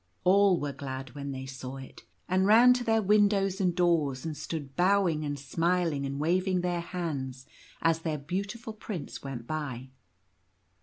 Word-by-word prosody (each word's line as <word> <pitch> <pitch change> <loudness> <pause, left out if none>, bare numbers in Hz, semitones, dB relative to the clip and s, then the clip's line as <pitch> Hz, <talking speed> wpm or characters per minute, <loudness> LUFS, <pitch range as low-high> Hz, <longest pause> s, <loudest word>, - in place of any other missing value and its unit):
All 190 -1 +5
were 145 -1 -3
glad 130 -2 -6
when 140 -1 -6
they 130 -1 -5
saw 130 0 -7
it, 135 -1 -11 0.2
and 185 +1 +2
ran 235 +4 +8
to 250 0 -2
their 225 -2 +2
windows 200 -1 +3
and 180 -2 +1
doors 165 -7 +1
and 160 -2 -3
stood 145 -2 -6
bowing 180 -4 +2
and 145 -1 -3
smiling 165 0 0
and 140 +1 -4
waving 180 +4 +1
their 175 -1 -1
hands 140 -8 -4 0.4
as 165 0 +3
their 160 -2 -2
beautiful 200 - -4
prince 205 -7 -6
went 130 -4 -6
by. 135 -4 -5
165 Hz, 160 wpm, -29 LUFS, 140-190 Hz, 0.4 s, ran